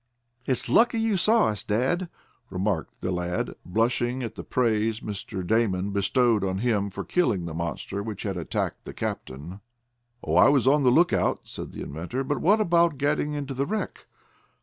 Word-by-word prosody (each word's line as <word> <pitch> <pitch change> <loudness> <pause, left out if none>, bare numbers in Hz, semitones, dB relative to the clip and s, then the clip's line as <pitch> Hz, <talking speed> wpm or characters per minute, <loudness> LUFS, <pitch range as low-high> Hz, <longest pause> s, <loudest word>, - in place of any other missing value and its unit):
"It's 130 - +1
lucky 235 0 +4
you 225 -2 +1
saw 220 - +4
us, 105 -2 -3
dad," 135 - 0 0.4
remarked 95 -2 -2
the 95 - -1
lad, 90 0 -2
blushing 120 +5 0
at 115 - -4
the - - -8
praise 110 -2 +1
Mr. 100 -2 -5
Damon 100 -2 +1
bestowed 105 +2 +2
on 95 -1 -1
him 105 -2 0
for 95 - -5
killing 115 - +1
the 85 - -5
monster 85 +4 -4
which 105 -1 -5
had 100 -2 -2
attacked 85 -2 -3
the - - -8
captain. 75 +9 -5 0.6
"Oh, 80 +2 0
I 105 +8 +7
was 135 -3 +3
on 145 +2 +5
the 130 - +4
lookout," 170 +8 +3
said - - -8
the - - -7
inventor. 85 - -4
"But 145 +2 -2
what 205 +5 +4
about 170 -6 +3
getting 145 +1 0
into 145 -2 -4
the 135 +2 -1
wreck?" 215 +4 -4
115 Hz, 175 wpm, -26 LUFS, 95-145 Hz, 0.6 s, I